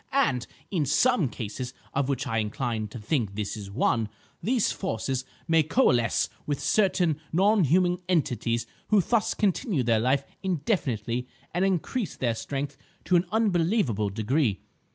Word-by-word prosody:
And, 235 - +2 0.2
in 160 -8 0
some 200 - +3
cases—of 125 +5 -4
which 135 0 -1
I 115 -4 0
incline 110 0 -2
to 105 - -9
think 110 -2 -1
this 105 0 -3
is 100 -2 -7
one—these 115 - 0
forces 130 - -2 0.2
may 165 -1 +5
coalesce 145 - +2 0.2
with 145 -2 -1
certain 175 -3 +2
non 195 +2 +4
human 180 +4 +3
entities 120 - +1 0.2
who 215 - +4
thus 220 +4 +1
continue 195 - +1
their 115 -2 +3
life 130 +4 +2 0.2
indefinitely 130 - -1 0.3
and 175 +2 +1
increase 195 - -1
their 120 -3 0
strength 140 +4 -4 0.3
to 180 - +3
an 175 +1 +4
unbelievable 175 - +2
degree. 110 +2 0
140 Hz, 135 wpm, -27 LUFS, 115-185 Hz, 0.3 s, may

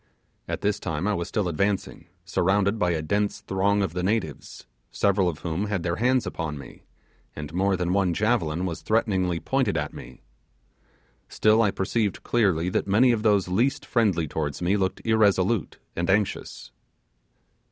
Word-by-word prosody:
At - - -4
this 105 0 0
time 80 0 -3
I 105 - +1
was 85 -3 -2
still 105 -4 -1
advancing, 95 +4 -2 0.2
surrounded 100 +3 +1
by 90 - +2
a 80 -3 -1
dense 100 +5 -1
throng 100 +1 +1
of 90 -4 -2
the 90 - -2
natives, 95 -5 -3 0.2
several 100 -2 +2
of 75 -3 -7
whom 90 +5 -2
had 100 -4 -2
their 85 0 -1
hands 125 +2 +2
upon 80 -3 -4
me, 70 - -12 0.5
and 75 +1 -7
more 95 +1 +1
than 90 0 -1
one 95 -3 +1
javelin 90 -6 0
was 85 -3 -4
threateningly 95 -6 0
pointed 130 -6 0
at 75 0 -3
me. 65 - -11 1.1
Still 110 +1 +3
I 105 - +3
perceived 100 +2 -1
clearly 95 -8 +1
that 90 - -1
many 115 +6 +4
of 115 -3 0
those 105 -4 +2
least 115 +10 0
friendly 100 -9 +1
towards 75 -1 -3
me 90 +3 +1
looked 95 -2 -2
irresolute 105 -2 +2 0.2
and 85 +2 -2
anxious. 100 - -1
95 Hz, 165 wpm, -25 LUFS, 85-105 Hz, 1.1 s, many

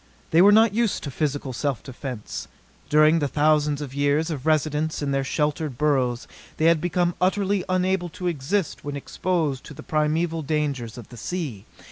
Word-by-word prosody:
They 165 - +6
were 200 +2 +8
not 220 0 +5
used 230 -1 0
to 140 - -4
physical 145 -2 -2
self 140 +1 -2
defense. 125 -4 -6 0.4
During 155 +2 +5
the 145 - 0
thousands 150 0 +2
of 135 -3 -6
years 145 +4 +1
of 145 -1 -5
residence 155 0 +1
in 140 - -1
their 135 0 +1
sheltered 150 -1 -1
burrows 130 -5 +1 0.3
they 155 - +1
had 165 -2 +4
become 175 0 +1
utterly 195 +1 +1
unable 185 -1 +1
to 180 - -5
exist 170 +3 -1
when 145 0 -4
exposed 150 -1 -1
to 150 - -10
the 155 - -10
primeval 160 +2 0
dangers 140 -7 -2
of 120 - -10
the 120 - -11
sea. 130 - -5
150 Hz, 175 wpm, -24 LUFS, 140-175 Hz, 0.4 s, were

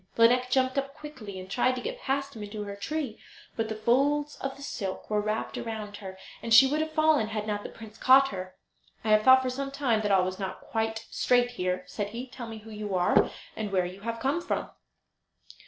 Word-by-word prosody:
Lineik 250 +2 +5
jumped 260 +1 +2
up 275 +1 -5
quickly, 250 -11 -8
and 185 - -8
tried 250 +6 +1
to 250 - -4
get - - -5
past 275 0 -2
him 220 - -8
back 205 -1 -7
to 210 -1 -4
her 200 -1 -6
tree; 270 +2 -4 0.4
but 225 -1 -1
the 220 - -3
folds 280 +7 +2
of 270 0 -4
the 280 - -11
silk 195 -8 -4
were 210 0 +2
wrapped 215 +1 -2
round 215 -3 -5
her, 190 -2 -8 0.2
and 230 - -5
she 225 +4 +10
would 295 +3 +1
have 315 - -1
fallen 310 -7 +3
had 215 -1 -3
not 205 -1 -2
the - - -7
prince 220 -1 -12
caught 270 +1 +6
her. 185 -1 -6 0.5
"I 220 - -2
have 215 0 +6
thought 260 +3 +7
for 255 - -1
some 275 +2 -3
time 265 -6 +1
that 205 -1 0
all 190 -2 +4
was 185 +1 -4
not 190 -1 -4
quite 225 0 -2
straight 245 -1 +3
here," 180 -5 -2
said 205 -2 -4
he. 235 +4 -5
"Tell 245 -2 -8
me 225 -1 -7
who 220 +1 -12
you 210 -2 -4
are, 180 -1 +4 0.3
and 215 -2 -4
where 185 -2 +2
you 185 +2 -8
come 230 +9 -1
from?" - - -3
225 Hz, 230 wpm, -28 LUFS, 210-265 Hz, 0.5 s, she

